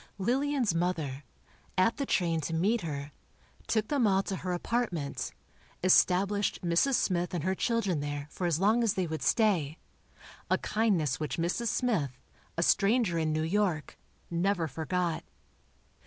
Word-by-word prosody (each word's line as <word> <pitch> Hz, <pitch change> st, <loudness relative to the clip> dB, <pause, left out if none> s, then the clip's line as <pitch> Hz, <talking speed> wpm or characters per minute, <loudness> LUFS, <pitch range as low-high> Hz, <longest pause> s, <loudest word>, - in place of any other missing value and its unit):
Lillian's 255 Hz, -, +1 dB
mother, 160 Hz, -5 st, -2 dB, 0.5 s
at 185 Hz, +5 st, +3 dB
the 280 Hz, -, -2 dB
train 165 Hz, -3 st, +1 dB
to 165 Hz, +2 st, -3 dB
meet 205 Hz, +7 st, +2 dB
her, 145 Hz, -3 st, -5 dB, 0.6 s
took 220 Hz, -1 st, 0 dB
them 275 Hz, -6 st, +2 dB
all 195 Hz, -1 st, +3 dB
to 195 Hz, -1 st, -3 dB
her 185 Hz, -, -4 dB
apartment, 175 Hz, -, -2 dB, 0.5 s
established 195 Hz, +2 st, +3 dB
Mrs. 175 Hz, +11 st, +3 dB
Smith 180 Hz, -3 st, 0 dB
and 165 Hz, -, -2 dB
her 190 Hz, +2 st, +1 dB
children 200 Hz, -5 st, 0 dB
there 145 Hz, 0 st, -4 dB
for 180 Hz, -, -2 dB
as 165 Hz, -2 st, +1 dB
long 215 Hz, +5 st, +3 dB
as 225 Hz, -4 st, +1 dB
they 185 Hz, -1 st, 0 dB
would 160 Hz, -1 st, -4 dB
stay—a 175 Hz, -, -1 dB
kindness 190 Hz, -, 0 dB
which 155 Hz, -2 st, -3 dB
Mrs. 175 Hz, +8 st, -1 dB
Smith, 175 Hz, -, 0 dB, 0.4 s
a 170 Hz, -, +2 dB
stranger 200 Hz, -2 st, +3 dB
in 155 Hz, -1 st, 0 dB
New 155 Hz, 0 st, 0 dB
York, 175 Hz, -2 st, 0 dB, 0.4 s
never 175 Hz, 0 st, +1 dB
forgot. 170 Hz, +2 st, -2 dB
180 Hz, 145 wpm, -30 LUFS, 160-210 Hz, 0.6 s, at